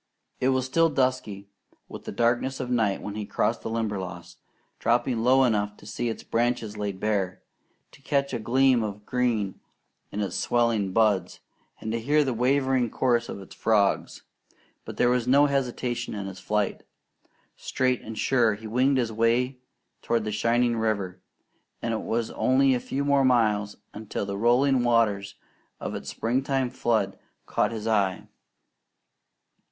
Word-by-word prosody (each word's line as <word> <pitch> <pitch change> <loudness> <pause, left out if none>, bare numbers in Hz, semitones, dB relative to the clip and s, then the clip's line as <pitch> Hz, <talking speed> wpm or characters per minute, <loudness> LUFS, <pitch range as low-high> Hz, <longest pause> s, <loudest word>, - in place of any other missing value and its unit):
It 130 - +2
was 130 -1 +1
still 165 +5 +3
dusky 130 -8 -1 0.4
with - - -10
the - - -5
darkness 120 +3 0
of 125 -2 -4
night 110 -5 +1
when 105 - -5
he 105 0 -4
crossed 115 +3 -1
the - - -5
Limberlost, 95 -6 -4 0.4
dropping 120 0 +1
low 130 +3 +4
enough 105 -4 0
to - - -16
see 120 +3 -3
its 110 - -5
branches 115 -2 -1
laid 100 -2 -4
bare, 100 -4 -1 0.5
to - - -18
catch 140 0 0
a - - -1
gleam 130 +2 +3
of 105 -1 -5
green 115 -6 -1 0.5
in 105 - -4
its 100 - -3
swelling 115 -5 +1
buds, 105 -2 +1 0.4
and 110 - -4
to 115 - -1
hear 145 +6 +3
the 130 -3 -1
wavering 130 0 +2
chorus 120 -1 +1
of - - -6
its 95 - -12
frogs. 105 -3 +1 0.6
But - - -8
there 120 - +3
was 125 -1 0
no 140 +3 +6
hesitation 125 -4 -2
in 100 -1 -4
his 95 -1 -7
flight. 105 -2 -1 0.7
Straight 130 -1 -1
and 110 0 -8
sure 115 -5 +2
he 110 +2 -12
winged 130 +5 +2
his 120 -3 0
way 120 +4 +1 0.4
toward 115 -2 0
the 105 - -3
shining 115 +2 +1
river; 100 -5 -2 0.6
and 115 - -2
it 110 - -2
was 115 0 -2
only 135 +1 +3
a 125 - +1
few 140 +3 -3
more 140 -1 +3
miles 105 -5 +2 0.2
until 105 -1 -4
the 100 0 -4
rolling 125 +4 +3
waters 105 -5 +1 0.4
of - - -4
its - - -6
springtime 130 +1 -1
flood 110 -5 0 0.3
caught - - 0
his 110 -2 -5
eye. 100 -5 +1
115 Hz, 160 wpm, -26 LUFS, 105-130 Hz, 0.7 s, no